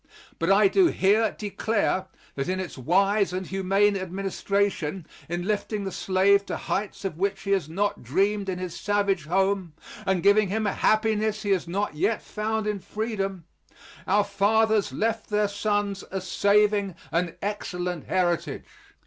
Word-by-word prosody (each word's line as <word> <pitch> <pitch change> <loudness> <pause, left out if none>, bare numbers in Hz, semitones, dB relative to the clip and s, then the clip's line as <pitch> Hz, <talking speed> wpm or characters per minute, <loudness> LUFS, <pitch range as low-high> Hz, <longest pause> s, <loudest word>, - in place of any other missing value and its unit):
But 165 +3 +2
I 200 +1 +6
do 360 - +4
here 215 - +2
declare 205 -2 -1 0.3
that 135 +4 -3
in 185 0 -1
its 185 -2 -5
wise 195 - +2
and 185 +1 -3
humane 195 +2 +2
administration 195 -2 -2 0.2
in 175 +1 -2
lifting 210 0 -1
the 195 - -4
slave 195 +2 +3
to - - -3
heights 200 0 -3
of 175 -4 -4
which 195 0 0
he 200 - -2
had 190 -6 +1
not 200 +5 -1
dreamed 195 - 0
in 185 - -2
his 180 -2 -5
savage 200 -5 0
home, 190 0 0 0.3
and 190 -3 +1
giving 205 +1 +5
him 215 +3 -1
a 205 - 0
happiness 215 0 +1
he 205 - 0
has 185 -3 +1
not 195 +2 -2
yet 210 +8 0
found 220 0 -2
in 210 -1 -1
freedom, 195 -4 -4 0.6
our 205 +2 +4
fathers 210 +1 +2
left 225 0 -2
their 210 0 +2
sons 205 -1 -1
a 190 - -3
saving 200 0 +2 0.2
and 170 0 0
excellent 180 -5 -3
heritage. 175 -2 0
200 Hz, 155 wpm, -26 LUFS, 185-210 Hz, 0.6 s, I